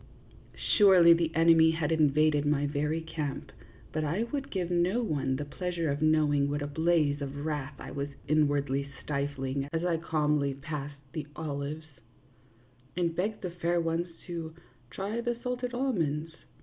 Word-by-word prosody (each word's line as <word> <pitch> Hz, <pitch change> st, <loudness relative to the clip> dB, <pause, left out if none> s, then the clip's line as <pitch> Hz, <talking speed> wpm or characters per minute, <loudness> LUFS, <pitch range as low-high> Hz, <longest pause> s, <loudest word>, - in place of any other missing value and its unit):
Surely 185 Hz, -5 st, +8 dB
the 165 Hz, -1 st, +1 dB
enemy 165 Hz, 0 st, +6 dB
had 160 Hz, -2 st, 0 dB
invaded 155 Hz, -1 st, +3 dB
my 145 Hz, -1 st, +1 dB
very 150 Hz, +3 st, -1 dB
camp, 155 Hz, -3 st, -5 dB, 0.4 s
but 155 Hz, -, -1 dB
I 170 Hz, +9 st, 0 dB
would 275 Hz, -1 st, -3 dB
give 180 Hz, -3 st, -2 dB
no 180 Hz, +7 st, +2 dB
one 135 Hz, -9 st, 0 dB
the 145 Hz, +2 st, -3 dB
pleasure 170 Hz, 0 st, -2 dB
of 140 Hz, +1 st, -3 dB
knowing 150 Hz, -2 st, +3 dB
what 145 Hz, 0 st, -2 dB
a -, -, -3 dB
blaze 150 Hz, -1 st, +1 dB
of 140 Hz, +1 st, -5 dB
wrath 150 Hz, -2 st, -3 dB
I -, -, -8 dB
was 140 Hz, +1 st, -3 dB, 0.2 s
inwardly 145 Hz, -2 st, +1 dB
stifling 140 Hz, -1 st, -2 dB
as 165 Hz, +1 st, -1 dB
I 170 Hz, -2 st, +2 dB
calmly 150 Hz, -3 st, 0 dB
passed 145 Hz, 0 st, -6 dB, 0.2 s
the 155 Hz, -3 st, -4 dB
olives, 150 Hz, 0 st, -4 dB, 1.1 s
and 170 Hz, -2 st, 0 dB
begged 205 Hz, +5 st, -2 dB
the 180 Hz, -, -3 dB
fair 175 Hz, 0 st, 0 dB
ones 165 Hz, +1 st, 0 dB, 0.2 s
to 165 Hz, -3 st, -6 dB, 0.3 s
try 205 Hz, -, -3 dB
the 240 Hz, 0 st, -1 dB
salted 250 Hz, 0 st, -3 dB
almonds. 165 Hz, -, -1 dB
155 Hz, 155 wpm, -29 LUFS, 145-170 Hz, 1.1 s, Surely